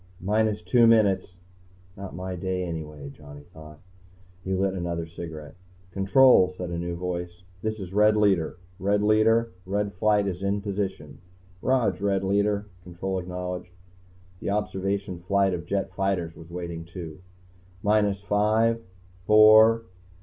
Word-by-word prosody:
"Minus 105 Hz, 0 st, 0 dB
two 115 Hz, +6 st, +4 dB
minutes." 100 Hz, -5 st, +3 dB, 0.6 s
Not 100 Hz, -1 st, -8 dB
my 90 Hz, 0 st, -5 dB
day, 90 Hz, 0 st, -2 dB
anyway, 75 Hz, -4 st, -6 dB
Johnny 75 Hz, 0 st, -13 dB
thought. 75 Hz, -1 st, -12 dB, 0.7 s
He 95 Hz, -, -4 dB
lit 95 Hz, 0 st, 0 dB
another 85 Hz, -2 st, -3 dB
cigarette. 80 Hz, -3 st, -9 dB, 0.4 s
"Control," 95 Hz, 0 st, +5 dB
said 90 Hz, -1 st, -5 dB
a 85 Hz, -, -3 dB
new 85 Hz, 0 st, -3 dB
voice, 90 Hz, 0 st, -5 dB, 0.2 s
"This 110 Hz, +1 st, -3 dB
is 95 Hz, -1 st, -7 dB
Red 105 Hz, +1 st, +4 dB
Leader. 95 Hz, -7 st, +2 dB, 0.2 s
Red 100 Hz, +2 st, +1 dB
Leader. 115 Hz, +2 st, +3 dB
Red 100 Hz, +2 st, -2 dB
Flight 105 Hz, +2 st, +2 dB
is 95 Hz, -2 st, -4 dB
in 100 Hz, +1 st, -1 dB
position." 95 Hz, -8 st, -4 dB, 0.4 s
"Rog, 115 Hz, -8 st, +1 dB
Red 100 Hz, -1 st, 0 dB
Leader," 100 Hz, +1 st, +1 dB, 0.2 s
Control 95 Hz, +2 st, -4 dB
acknowledged. 90 Hz, 0 st, -6 dB, 0.7 s
The -, -, -4 dB
Observation 100 Hz, -2 st, -2 dB
flight 95 Hz, +2 st, +1 dB
of 85 Hz, -1 st, -5 dB
jet 95 Hz, 0 st, -2 dB
fighters 95 Hz, -4 st, -1 dB
was 80 Hz, +1 st, -13 dB
waiting, 85 Hz, -1 st, -6 dB
too. 85 Hz, -2 st, -9 dB, 0.6 s
"Minus 105 Hz, -2 st, +2 dB
five... 110 Hz, +3 st, +2 dB, 0.4 s
four 110 Hz, +4 st, +6 dB
95 Hz, 135 wpm, -26 LUFS, 85-105 Hz, 0.7 s, four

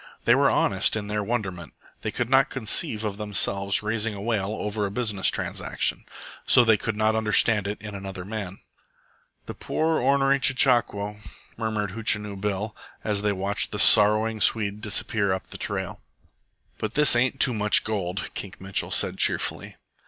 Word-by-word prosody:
They -, -, +5 dB
were -, -, +3 dB
honest -, -, +1 dB
in 105 Hz, -2 st, -5 dB
their 105 Hz, 0 st, -2 dB
wonderment. 95 Hz, -, -5 dB, 0.3 s
They -, -, -3 dB
could 125 Hz, -, -3 dB
not 135 Hz, +2 st, +3 dB
conceive 110 Hz, -3 st, -1 dB
of 105 Hz, -2 st, -4 dB
themselves 100 Hz, -1 st, 0 dB
raising 105 Hz, 0 st, -1 dB
a -, -, -8 dB
wail 105 Hz, -2 st, -2 dB
over 105 Hz, 0 st, -3 dB
a -, -, -6 dB
business 105 Hz, -3 st, -2 dB
transaction, -, -, -2 dB, 0.4 s
so 125 Hz, -, +6 dB
they 110 Hz, -1 st, +5 dB
could 105 Hz, +1 st, -4 dB
not 110 Hz, +1 st, +1 dB
understand 105 Hz, -1 st, +2 dB
it 105 Hz, -, -5 dB
in 105 Hz, -1 st, -9 dB
another 95 Hz, -2 st, -8 dB
man. 100 Hz, -2 st, -7 dB, 0.8 s
"The -, -, -7 dB
poor, 160 Hz, 0 st, -2 dB
ornery 135 Hz, +1 st, +2 dB
chechaquo," 120 Hz, -6 st, +1 dB, 0.4 s
murmured 110 Hz, -3 st, -3 dB
Hootchinoo 105 Hz, -1 st, 0 dB
Bill, 105 Hz, +1 st, -3 dB, 0.3 s
as 105 Hz, -2 st, -1 dB
they 105 Hz, 0 st, 0 dB
watched 100 Hz, +1 st, -2 dB
the 105 Hz, -, -5 dB
sorrowing 105 Hz, +1 st, +5 dB
Swede 105 Hz, -1 st, +2 dB
disappear 105 Hz, -1 st, -1 dB
up 95 Hz, 0 st, -4 dB
the -, -, -6 dB
trail. -, -, -5 dB, 0.8 s
"But 110 Hz, +1 st, -5 dB
this 150 Hz, -4 st, +7 dB
ain't 130 Hz, +2 st, 0 dB
Too 125 Hz, -, +5 dB
Much 105 Hz, -1 st, +4 dB
Gold," 100 Hz, -3 st, -4 dB
Kink 100 Hz, -2 st, -8 dB
Mitchell 95 Hz, 0 st, -2 dB
said -, -, 0 dB
cheerfully. -, -, -1 dB
105 Hz, 165 wpm, -24 LUFS, 100-115 Hz, 0.8 s, this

